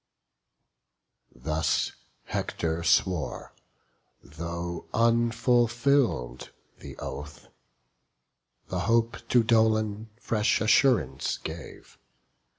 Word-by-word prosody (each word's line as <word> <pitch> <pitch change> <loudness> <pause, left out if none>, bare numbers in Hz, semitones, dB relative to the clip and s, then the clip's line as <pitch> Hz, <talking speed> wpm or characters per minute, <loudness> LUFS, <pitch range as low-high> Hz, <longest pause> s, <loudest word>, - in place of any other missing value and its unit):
Thus 80 +5 0 0.3
Hector 80 0 -3
swore; 85 -1 0 0.7
though 85 +2 -6
unfulfill'd 115 - +2 0.3
the - - -10
oath. 75 +1 -8 1.2
The 90 - -2
hope 115 0 +2
to 120 -2 +4
Dolon 110 -1 +1
fresh 105 -3 +1
assurance 110 - +2
gave. 80 +1 -10
105 Hz, 65 wpm, -27 LUFS, 80-115 Hz, 1.2 s, to